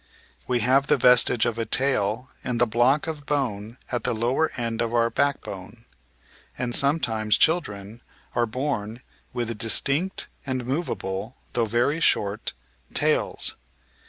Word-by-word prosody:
We 125 -2 +1
have 135 +5 +3
the - - +4
vestige 125 -2 +5
of 115 0 -2
a 115 - -1
tail 125 -1 0
in 125 -2 -2
the 120 - +4
block 120 +6 +2
of 155 -3 -6
bone 120 -6 -2
at 120 -2 -2
the - - 0
lower 125 +8 +1
end 115 -2 -2
of 115 0 -1
our 115 0 +2
backbone; 115 -5 -3 0.7
and 125 -1 -2
sometimes 115 -7 +3
children 115 - 0 0.3
are 120 -1 +1
bom 120 -2 -3 0.3
with 115 -1 -3
distinct 140 +10 +2 0.2
and 130 -3 -3
movable 120 - -3
— - - -34
^though 115 -2 +1
very 120 +8 +1
short 105 -8 +1 0.2
— 65 -1 -32
^tails. - - +1
120 Hz, 145 wpm, -25 LUFS, 110-135 Hz, 0.7 s, vestige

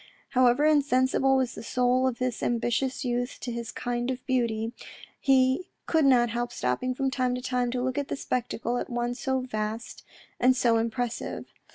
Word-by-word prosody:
However 255 +2 +4
insensible 270 -2 +3
was 255 -2 0
the - - -8
soul 250 +2 +2
of 250 -2 -2
this 255 -2 -2
ambitious 240 +3 0
youth 245 0 -1
to 245 - -4
this 235 -1 -5
kind 240 0 -2
of 255 -1 -4
beauty, 235 -3 0 0.5
he 265 +5 +3 0.2
could 320 -3 +2
not 240 -3 +4
help 240 +1 -2
stopping 125 - -1
from 270 +1 0
time 255 -2 0
to 250 - -4
time 250 -1 0
to 250 0 -2
look 260 +2 -1
at 285 - -5
a - - 0
spectacle 245 -2 -2
at - - -5
once 240 0 -2
so 265 -1 0
vast 220 -2 -4 0.4
and 255 +1 +4
so 235 -2 +3
impressive. 230 +1 -3
250 Hz, 180 wpm, -27 LUFS, 240-260 Hz, 0.5 s, However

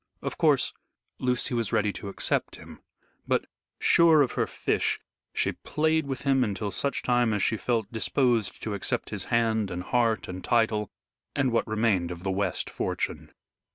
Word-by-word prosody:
Of - - -3
course, - - +3 0.5
Lucy 125 0 +1
was 115 -3 0
ready 105 -1 +1
to 100 - -6
accept 100 - -1
him, - - -13 0.5
but, - - +1 0.3
sure 165 -3 +6
of 130 - -2
her - - 0
fish, - - 0 0.3
she - - 0
played 160 -1 0
with 130 -3 -3
him 135 -1 +3
until 100 -1 -2
such 140 +8 -1
time 120 -2 +2
as 105 - 0
she 110 - +2
felt 110 0 -1
disposed 115 -3 +1
to 110 - -2
accept 100 - -2
his - - -4
hand 110 -3 +1
and 90 0 -4
heart 115 -3 +1
and 90 0 -6
title 110 -3 +1 0.5
and 135 -3 +2
what 115 - +1
remained 105 -5 +1
of 90 0 -7
the 95 - -1
West 95 -2 -1
fortune. - - -3
115 Hz, 170 wpm, -27 LUFS, 100-125 Hz, 0.5 s, sure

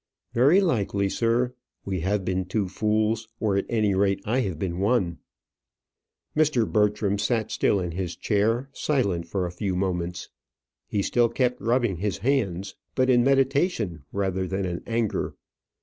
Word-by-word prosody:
"Very 145 +11 +5
likely, 100 - +1
sir. 120 +3 +1 0.3
We 95 -2 -2
have 95 +3 -1
been 95 0 -1
two 100 +2 -1
fools; 110 +3 0
or, 105 -3 +1
at 100 - 0
any 110 -3 +2
rate, 100 0 +2
I 120 +5 +1
have 95 -10 -2
been 85 +1 -3
one." 95 -5 +1 1.2
Mr. 150 -7 +3
Bertram 105 -2 +1
sat 110 -1 0
still 100 - +2
in 90 -2 -3
his 90 0 -4
chair, 115 +5 +1
silent 100 - 0
for 90 +1 -1
a 90 - -4
few 95 +1 -2
moments. 90 -2 -2 0.6
He 100 -2 -1
still 120 +2 +2
kept 125 0 0
rubbing 120 -5 +1
his 100 +3 -2
hands, 100 -8 -1 0.2
but 130 0 +3
in 120 -1 +5
meditation 135 - +1
rather 95 -1 -1
than 95 +1 -2
in 90 -1 -3
anger. 115 -2 -1
105 Hz, 155 wpm, -25 LUFS, 95-120 Hz, 1.2 s, Very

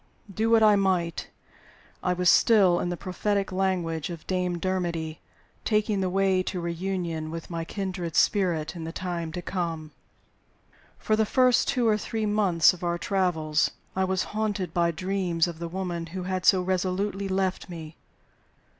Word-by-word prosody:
Do 220 +4 0
what 225 -1 +5
I 210 -1 +7
might, 185 -4 0 0.7
I 180 - +1
was 180 0 0
still 195 -4 +5
(in 175 - -1
the 175 - -3
prophetic 200 +2 -1
language 180 -4 -1
of 170 -2 -8
Dame 180 -1 -1
Dermody) 170 -3 -2 0.4
taking 210 -2 +1
the 185 - 0
way 190 0 +2
to 185 0 -3
reunion 170 -2 -3
with 165 +2 -7
my 165 -1 -3
kindred 180 -2 -4
spirit 180 -6 +2
in 165 - -6
the 165 - -5
time 170 -2 -4
to 180 - -5
come. 165 -4 -3 1.1
For 215 - +1
the 220 - +3
first 255 0 +3
two 250 -4 +1
or 215 -1 +3
three 220 +1 -3
months 195 -7 +4
of 180 - -11
our 170 0 0
travels 170 -5 +1 0.3
I 190 - +1
was 190 0 0
haunted 210 -4 -2
by 170 -1 +2
dreams 180 0 0
of 170 -2 -7
the 170 - -4
woman 175 -2 -4
who 185 +2 -6
had 185 0 -2
so 185 -2 +5
resolutely 190 +2 -1
left 190 -1 -1
me. 160 -2 -8
185 Hz, 165 wpm, -26 LUFS, 170-195 Hz, 1.1 s, I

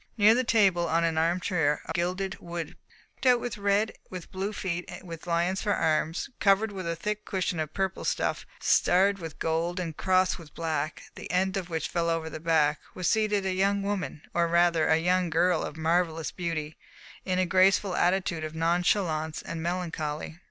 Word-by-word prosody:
Near 210 +1 +7
the 255 +2 +2
table, 195 -8 +3
on 165 +1 +2
an 165 -1 +1
armchair 165 -2 +1
of - - -5
gilded 185 +3 -2
wood 170 -2 -6 0.4
picked - - -2
out 250 -1 +6
with 235 -2 -5
red, 200 +2 +1 0.2
with 185 -2 -8
blue 195 +2 -3
feet, 180 -4 -3
and 185 - -10
with 165 0 -8
lions 175 +3 +1
for 205 - +1
arms, 160 +1 0
covered 205 +1 +3
with 190 -3 -5
a 170 - -1
thick 210 +4 -3
cushion 185 -3 -2
of 155 -1 -4
purple 190 -1 -1
stuff - - -1 0.2
starred 195 +2 +3
with 165 -3 -7
gold 165 +2 -1
and 165 -4 -4
crossed 185 0 +2
with 160 -3 -14
black, 155 -2 -2
the - - -9
end 190 +2 +1
of 185 -2 -3
which 160 -1 -2
fell 170 -1 -1
over 165 -1 -1
the - - -6
back, 155 -2 +2 0.2
was 185 - -2
seated 210 -2 +1
a 190 - 0
young 200 +2 +1
woman, 195 -6 -3
or 170 0 +2
rather, 170 -1 +3
a 160 - +4
young 180 +1 +1
girl 170 +1 +2
of 155 - -5
marvellous 165 0 0
beauty, 160 -3 -4 0.5
in 185 -1 -1
a 185 - +2
graceful 185 +1 +3
attitude 175 -3 +1
of 155 0 -5
nonchalance 165 -1 0
and 165 -1 -5
melancholy. 160 -2 -3
175 Hz, 190 wpm, -28 LUFS, 165-190 Hz, 0.5 s, Near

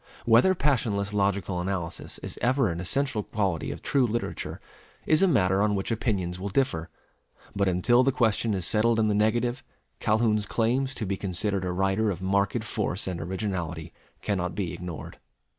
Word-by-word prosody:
Whether 120 +12 +5
passionless 110 - 0
logical 100 -3 0
analysis 90 -2 -4
is - - -7
ever 130 -1 +2
an 85 0 -3
essential 120 +5 0
quality 100 -6 -2
of - - -7
true 135 -3 +2
literature, 115 +1 -4 0.5
is 155 - +5
a 195 - +5
matter 95 - +3
on 105 0 +2
which 95 +3 -2
opinions 95 -6 -1
will 100 +2 -3
differ; 90 -8 0 0.7
but 100 0 +1
until 95 +7 +4
the 135 +1 +3
question 115 -3 +1
is 95 -3 -1
settled 115 +3 +3
in 110 -1 +2
the - - +2
negative, 120 +4 +1 0.4
Calhoun's 110 -1 +2
claims 130 +5 0
to 110 - -3
be 100 0 -2
considered 95 +1 -1
a 90 - -1
writer 95 +4 +1
of 90 -4 -3
marked 100 +4 0
force 105 -3 -2
and 90 -3 -4
originality 90 -3 -4 0.3
cannot 90 -4 -1
be 95 -5 -2
ignored. 90 -3 -7
100 Hz, 170 wpm, -27 LUFS, 95-115 Hz, 0.7 s, Whether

